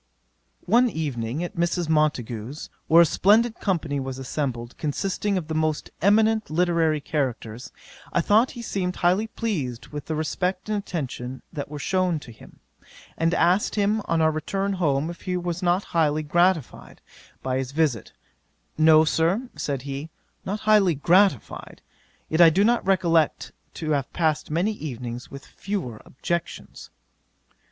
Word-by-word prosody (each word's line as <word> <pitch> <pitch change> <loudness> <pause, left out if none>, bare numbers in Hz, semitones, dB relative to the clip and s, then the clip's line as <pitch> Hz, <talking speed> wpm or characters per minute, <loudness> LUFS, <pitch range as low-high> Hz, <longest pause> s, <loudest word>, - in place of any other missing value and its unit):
'One 245 +1 +4
evening 140 - -3
at 175 - -6
Mrs. 170 0 0
Montagu's, 140 -5 -1 0.2
where 170 +2 +7
a - - +3
splendid 220 +8 +3
company 160 -7 -1
was 135 -1 -5
assembled, 130 -3 -4
consisting 195 +6 -1
of 170 -4 -4
the 160 - -3
most 155 -1 -1
eminent 220 +3 +3
literary 165 -1 +2
characters, 125 -6 -3 0.4
I - - +1
thought 215 +8 +3
he 235 - -6
seemed 180 -4 -2
highly 185 +5 +2
pleased 160 - -4
with 145 -1 -7
the 160 - -2
respect 180 +5 -2
and 215 - 0
attention 130 -8 -5
that 140 -2 -5
were 150 - -6
shewn 180 +2 0
him, 120 -6 -15 0.5
and 165 +1 +1
asked 185 +4 +2
him 210 +1 +1
on 165 -1 +1
our 160 - +4
return 195 +6 -2
home 155 -3 0
if 170 - -12
he 180 -1 -2
was 175 0 -3
not 180 +2 +2
highly 155 -2 +2
gratified 175 -1 0 0.4
by 130 0 -1
his 130 -1 -4
visit: 140 - 0 0.7
"No, 155 0 +6
Sir, 180 +11 0
(said 140 -3 -3
he) 140 +3 -5 0.3
not 205 +4 -4
highly 210 -6 +4
gratified; 170 - +1 0.5
yet 160 +2 +2
I 170 - +9
do 185 +5 +2
not 235 +2 +2
recollect 170 -5 +2 0.2
to 155 -2 -3
have 140 -3 -1
passed 155 -3 0
many 170 +8 +1
evenings 125 - -6
with 140 0 -10
fewer 175 - -5
objections." 170 +5 -5
160 Hz, 150 wpm, -24 LUFS, 145-190 Hz, 0.7 s, I